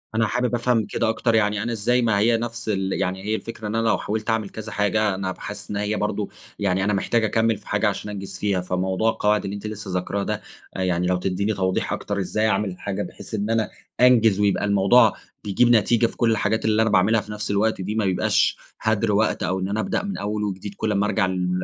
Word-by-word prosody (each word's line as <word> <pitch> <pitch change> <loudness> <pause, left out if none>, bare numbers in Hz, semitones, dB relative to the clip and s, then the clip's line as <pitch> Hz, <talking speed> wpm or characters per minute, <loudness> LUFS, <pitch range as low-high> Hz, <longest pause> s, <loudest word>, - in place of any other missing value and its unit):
أنا 115 0 +2
حابِب 125 +1 0
افهَم 120 -2 +1
كده - - -1
أكتر، 115 0 +1
يعني 105 -1 +2
أنا 120 - -2
إزاي 120 +3 +1
ما 110 -4 +2
هي 115 +2 +3
نفس 120 0 -5
ال 95 -2 0
يعني 95 +1 -2
هي 110 +1 0
الفكرة، 110 -1 -6
إن 105 - -3
أنا 115 0 +1
لو - - +3
حاوِلت 110 +2 -3
اعمَل 110 -3 0
كذا 110 0 -8
حاجة، 105 -1 +1
أنا 95 -1 -3
هابقى - - -7
حاسس 105 - -7
إن - - -3
هي 105 +1 -1
برضه 105 0 -2 0.3
يعني 95 -1 +1
أنا 105 +1 +1
محتاج 110 +3 +1
أكمّل 110 0 +2
في - - -20
حاجة - - +1
عشان 105 - -3
أنجِز 100 -1 -7
فيها. 100 -3 0
فموضوع 95 +4 0
القواعد 105 -1 +1
اللي 100 - -4
أنتِ 100 +1 -6
لسه 105 -2 -6
ذاكِراه 100 +2 -1
ده، 105 0 -3 0.3
يعني 90 -1 0
لو 90 0 +2
تدّيني 95 +4 -1
توضيح 95 -1 -1
أكتر، 100 -1 -3
إزاي 110 +3 0
أعمل 105 -1 +1
الحاجة 95 +2 -4
بحيث - - -11
إن 105 0 -1
أنا 115 -1 +1 0.3
أنجِز، 115 -5 +5
ويبقى 100 0 +2
الموضوع 100 +4 +5 0.3
بيجِيب 105 +4 +2
نتيجة 115 +1 +4
في - - -12
كل 115 -2 +3
الحاجات 110 0 0
اللي 110 0 +3
أنا 110 - +2
باعملها 105 +2 +3
في 105 - -10
نفس 105 -1 -4
الوقت 105 0 +1
دي، 105 +4 -3
ما 110 - +1
يبقاش 95 -2 +2 0.2
هَدر 110 0 +1
وقت، 105 -1 +1
أو 95 +1 0
إن 95 - -2
أنا 105 +2 -1
ابدأ 110 - -1
من 200 -1 -4
أول 105 +1 -2
وجديد 100 0 -4
كل 110 - -1
اما 100 0 +1
ارجع 105 - +1
ل 90 -1 -1
105 Hz, 235 wpm, -23 LUFS, 100-110 Hz, 0.3 s, أنجِز